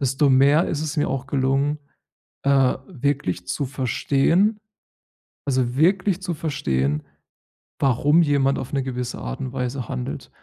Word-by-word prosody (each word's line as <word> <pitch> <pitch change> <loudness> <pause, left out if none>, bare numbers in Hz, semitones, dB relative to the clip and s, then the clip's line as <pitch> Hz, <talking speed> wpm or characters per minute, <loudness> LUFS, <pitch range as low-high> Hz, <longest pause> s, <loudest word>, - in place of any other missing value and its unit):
desto 135 +1 +2
mehr 140 +5 +4
ist 150 - -2
es 155 +1 -4
mir 150 - +1
auch 135 0 -3
gelungen, 140 +2 +1 0.7
äh, 135 -2 +3
wirklich 140 - -2
zu 140 - -2
verstehen 140 - +1 0.9
also 130 -3 0
wirklich 190 +3 +2
zu 180 -3 -2
verstehen, 75 - -1 0.8
warum 145 +5 +3
jemand 140 -3 +2
auf 130 - -7
'ne 135 -1 0
gewisse 125 -1 -4
Art - - -5
und 130 -1 -4
Weise 125 -2 -3
handelt. 60 0 -5
135 Hz, 140 wpm, -23 LUFS, 125-150 Hz, 0.9 s, mehr